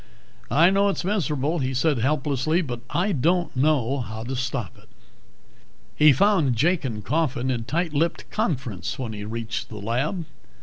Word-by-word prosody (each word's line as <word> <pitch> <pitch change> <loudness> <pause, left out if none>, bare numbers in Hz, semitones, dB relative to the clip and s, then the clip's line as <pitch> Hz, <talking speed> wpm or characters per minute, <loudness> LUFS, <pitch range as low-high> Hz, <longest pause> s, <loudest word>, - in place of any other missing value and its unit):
"I 165 - +5
know 200 +1 +3
it's 195 - -2
miserable," 160 -5 0
he 130 -1 -1
said 145 0 +2
helplessly. 150 +5 +1
"But 120 -5 -5
I 190 +4 0
don't 175 +3 +1
know 135 -1 +2
how 110 -2 -5
to 130 +3 -4
stop 130 - -3
it." - - -22 1.1
He 150 0 +7
found 160 - +3
Jake 160 +8 +2
and 110 -6 -4
Coffin 135 -3 0
in 115 -3 -2
tight 165 +4 -1
lipped 165 +3 0
conference 115 - -2
when 120 -4 -4
he 105 -1 -6
reached 115 +1 -4
the - - -9
lab. 130 - -2
140 Hz, 165 wpm, -24 LUFS, 120-165 Hz, 1.1 s, He